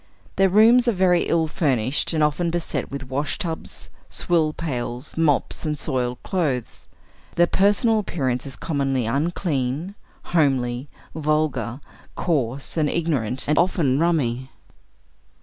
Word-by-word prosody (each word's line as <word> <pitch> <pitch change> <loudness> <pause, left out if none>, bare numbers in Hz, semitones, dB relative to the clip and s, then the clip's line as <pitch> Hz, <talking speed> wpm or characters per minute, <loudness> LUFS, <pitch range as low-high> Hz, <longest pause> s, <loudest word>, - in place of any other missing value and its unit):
Their 195 0 +4
rooms 230 +5 +6
are 235 - +4
very 180 -2 +3
ill 165 -1 +2
furnished, 135 -5 0
and 155 -2 +1
often 150 +3 +1
beset 170 0 -2
with 135 -1 -6
wash 140 +2 -1
tubs, 165 -2 -6 0.2
swill 160 -3 +1
pails, 125 -4 -4
mops 155 -4 +1
and 150 -2 -2
soiled 125 -4 -2
clothes; 145 - -2 0.5
their 175 - +5
personal 205 +5 +3
appearance 135 -10 -2
is 135 - -7
commonly 135 -5 -1
unclean, 145 - -1 0.4
homely, 135 -4 +1 0.2
vulgar, 150 -4 -1 0.3
coarse, 140 -4 0
and 150 -2 +2
ignorant, 135 -7 -1
and 150 - +3
often 160 -6 +2
rummy. 130 -7 0
150 Hz, 125 wpm, -23 LUFS, 130-170 Hz, 0.5 s, rooms